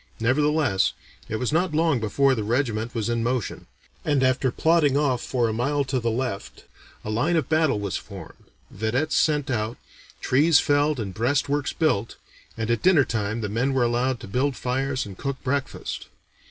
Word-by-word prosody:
Nevertheless 145 -2 +2 0.4
it 110 - -2
was 125 +5 -1
not 170 -1 +1
long 160 -4 +2
before 135 +5 +2
the 110 -4 -2
regiment 115 0 -1
was 115 -2 -1
in 120 -1 0
motion; 120 -2 -2 0.4
and 145 -3 +1
after 130 0 +2
plodding 150 0 +2
off 135 -4 +1
for 120 -3 0
a 110 - -1
mile 140 +5 0
to 130 -1 -1
the 115 -1 -1
left, 115 -4 -4 0.4
a 110 - -3
line 145 +11 +1
of 160 -6 0
battle 155 -8 +2
was 100 -2 -2
formed, 95 -6 -11 0.3
vedettes 125 +9 -1
sent 150 -3 +2
out, 110 0 -2 0.4
trees 145 +4 +4
felled 145 -1 +2
and 100 -4 -4
breastworks 140 +6 0
built, 125 -9 0 0.4
and 115 0 -1
at 115 - 0
dinner 175 -7 +5
time 110 0 -2
the 105 - -2
men 125 +6 0
were 130 - +3
allowed 120 +1 0
to - - -8
build 130 +7 0
fires 130 +1 -1
and 100 -3 -10
cook 140 -1 -3
breakfast. 135 +1 -3
130 Hz, 180 wpm, -24 LUFS, 115-145 Hz, 0.4 s, dinner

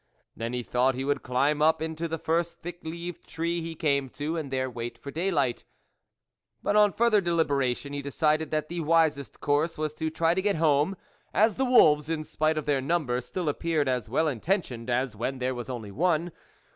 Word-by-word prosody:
Then 115 +2 -4
he 125 0 -2
thought 125 +2 +1
he 130 +1 -3
would 145 -1 0
climb 140 +4 +1
up 160 +1 +4
into 160 +1 -3
the 165 0 -3
first 170 +2 -1
thick 175 +1 -6
leaved 170 +1 -7
tree 170 +1 -2
he 165 0 -5
came 140 -4 +1
to, 150 +5 -4
and 155 -4 -3
there 130 0 -1
wait 120 -1 -6
for 140 - -8
day 170 +6 -1
light; 140 -9 0 1.0
but - - +1
on 210 -1 +6
further 220 0 +3
deliberation, 145 -6 0
he 145 - -3
decided 155 +2 +1
that 155 -1 -1
the 175 +1 -4
wisest 160 -3 +1
course 150 +3 +1
was 155 -1 -2
to 160 +1 -2
try 165 +1 +2
to 190 - 0
get 205 +1 +1
home, 155 +3 +2 0.4
as 215 +1 +4
the 265 - 0
wolves, 150 - +5
in 160 -1 -1
spite 155 +1 0
of 155 - -2
their 140 -2 +1
number, 135 -4 0
still 170 +7 -4
appeared 150 0 0
as 125 -4 -1
well 150 +7 +2
inten 160 - +1 0.2
tioned - - -8
as 125 -1 0
when 130 +5 -3
there 130 0 -1
was 120 0 -6
only 115 -5 -5
one. 170 - +1
155 Hz, 210 wpm, -27 LUFS, 135-170 Hz, 1.0 s, on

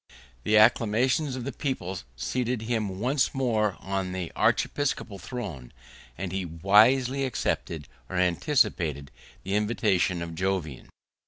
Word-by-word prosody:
The 110 - +4
acclamations 120 +5 +3
of 130 - -5
the 140 - -3
people 105 - -3 0.2
seated 125 - -2
him 110 -5 -2
once 130 +5 +1
more 110 -6 +1
on 95 -1 -3
the 90 -2 -4
archiepiscopal 130 -8 0
throne; 85 - -6 0.5
and 95 -1 -4
he 95 0 -2
wisely 110 +11 +4
accepted, 85 - -2 0.2
or - - -5
anticipated, 85 - +1 0.3
the 95 - -3
invitation 100 -5 +1
of 85 -1 -6
Jovian. 90 -5 -3
105 Hz, 120 wpm, -27 LUFS, 90-125 Hz, 0.5 s, The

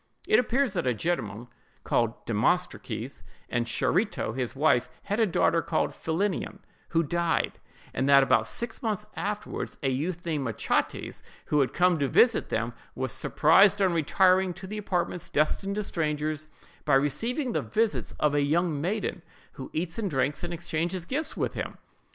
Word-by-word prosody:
It 215 - +5
appears 250 -2 +1
that 175 -8 -1
a 125 - +2
gentleman, 120 -7 -2 0.4
called - - 0
Demostrates, - - -1 0.3
and 120 0 -1
Charito, 160 - 0
his 130 -1 -3
wife, 135 -3 +3
had 205 +2 -2
a 225 - +4
daughter 165 -2 +2
called 160 - 0
Philinnion, 180 +4 -2 0.3
who 165 0 +2
died; 170 +2 0 0.3
and 135 - 0
that 140 -1 +8
about - - +3
six 235 +2 -4
months 210 -4 -2
afterward, 210 +1 -4
a 135 - +2
youth 165 +7 -3
named 155 -4 -1
Machates, 115 - -2 0.2
who 150 - +1
had 135 - +2
come 180 -2 +3
to 140 - +1
visit 235 - +4
them, 115 +1 -1 0.2
was 130 -2 -2
surprised 195 +6 +4
on 190 -3 +3
retiring 185 +3 +3
to 190 - -9
the 210 +3 -5
apartments 180 -3 -2
destined 195 +6 0
to 210 - -1
strangers, 155 -3 -2 0.4
by 145 - +3
receiving 230 - +1
the - - 0
visits 220 0 -1
of 150 -1 +2
a 145 - +3
young 155 +1 +1
maiden 195 +1 -2 0.3
who 130 - -9
eats 165 +4 -3
and 205 -3 -1
drinks 140 +1 0
and 175 - -3
exchanges 170 +1 -2
gifts 290 - -2
with - - -1
him. - - -5
170 Hz, 165 wpm, -27 LUFS, 145-195 Hz, 0.4 s, that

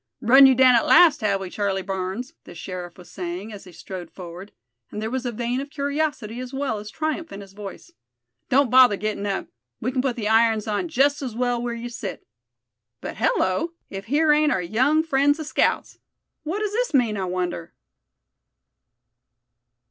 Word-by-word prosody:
"Run 265 +3 +8
you 265 - +4
down 255 0 +6
at 235 - +3
last, 320 -5 +6
have 200 -2 +1
we, 190 -2 -7
Charlie 195 -2 -1
Barnes?" 190 +6 -4
the - - -12
sheriff 175 0 -7
was 180 - -14
saying, 185 +4 -6
as 200 -1 -10
he 180 - -13
strode 175 0 -8
forward, 180 +2 -10 0.4
and - - -6
there 220 +1 -3
was 260 -1 -2
a - - -2
vein 240 +3 -2
of 280 - -8
curiosity 285 -5 -2
as 255 0 -6
well 270 -5 -2
as 210 +1 -9
triumph 315 +4 -3
in 200 - -8
his 195 -1 -13
voice. 205 - -10 0.6
"Don't 270 -2 +3
bother 255 -5 +6
getting 210 0 -3
up; 195 -1 -3 0.3
we 250 - -2
can 260 -1 0
put 260 -2 -1
the 215 -3 -3
irons 225 -1 +3
on 215 - -1
just 285 -1 +2
as 250 -5 -5
well 245 0 0
where 240 -1 -3
you 235 +1 -6
sit. 240 -1 -7 0.7
But - - -7
hello! 320 - 0 0.2
if 195 0 -6
here 300 +5 +2
ain't 300 0 +3
our 190 - +1
young 255 - +2
friends 290 -1 +2
the 315 - -5
scouts! - - 0 0.4
What 335 +7 -3
does 420 -1 -1
this 480 -7 0
mean, 235 -5 +2
I 195 -2 -2
wonder?" 180 -2 -4
235 Hz, 190 wpm, -23 LUFS, 195-280 Hz, 0.7 s, Run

